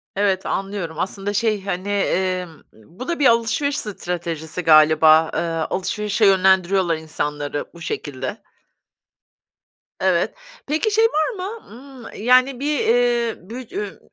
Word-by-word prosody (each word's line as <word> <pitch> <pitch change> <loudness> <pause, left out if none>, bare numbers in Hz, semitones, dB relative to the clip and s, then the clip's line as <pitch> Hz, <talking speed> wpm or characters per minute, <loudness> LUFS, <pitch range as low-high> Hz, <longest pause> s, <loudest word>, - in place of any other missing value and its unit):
Evet, 195 -2 +1
anlıyorum. 195 -5 -4
Aslında, 195 +2 -3
şey, 215 -2 0
hani, 190 +1 -3
emm, 185 -3 0 0.2
bu 170 - -12
da 340 -2 -2
bir 285 - +2
alışveriş 235 +5 +1
stratejisi 175 - -4
galiba. 155 0 +6
Eee, - - 0
alışverişe 190 +6 -1
yönlendiriyorlar 190 -2 +3
insanları 150 -2 -4
bu 170 - -14
şekilde. 140 - -5 1.6
Evet. - - +1 0.3
Peki 315 +9 0
şey 445 +2 +4
var 315 -5 +1
mı? 400 +5 -7 0.4
Imm, 210 - -9
yani, 255 +1 +4
bir, 295 0 0
eee, 240 -1 +2
bü 230 - -7 0.2
üy 415 +1 -5
195 Hz, 125 wpm, -21 LUFS, 165-240 Hz, 1.6 s, galiba